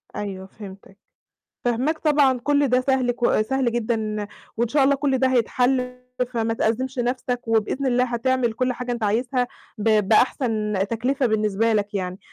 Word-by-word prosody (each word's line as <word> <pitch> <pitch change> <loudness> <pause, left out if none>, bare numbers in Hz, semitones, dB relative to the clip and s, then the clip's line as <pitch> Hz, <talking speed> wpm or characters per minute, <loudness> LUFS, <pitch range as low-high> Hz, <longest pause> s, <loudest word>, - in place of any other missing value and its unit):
أيوه، 190 -2 -5
فهمتك. 195 -1 -12 0.7
فاهماك 255 +7 0
طبعًا، 285 -4 +3
كُل 285 +2 +2
ده 255 +1 +3
سهل 260 -2 +1
ك 240 -2 +1
سهل 255 +1 0
جدًا 220 -3 -2 0.3
وإن 235 0 0
شاء 280 +1 +3
الله 280 +1 +4
كُل 275 -2 0
ده 260 0 +3
هيتحل، 250 +1 +1 0.3
فما 225 -1 0
تأزِّمش 255 +4 -1
نَفسك 245 0 -1
وبإذن 225 +5 0
الله 250 0 +2
هتعمل 245 0 0
كُل 255 +2 0
حاجة 250 0 -4
أنت 235 -2 -4
عايزها 245 +4 0 0.3
ب 210 -2 +2
بأحسن 220 -2 +2 0.2
تكلفة 255 +4 0
بالنسبة 215 0 +1
لك 205 -1 -1
يعني. 185 -1 -3
240 Hz, 155 wpm, -23 LUFS, 220-260 Hz, 0.7 s, الله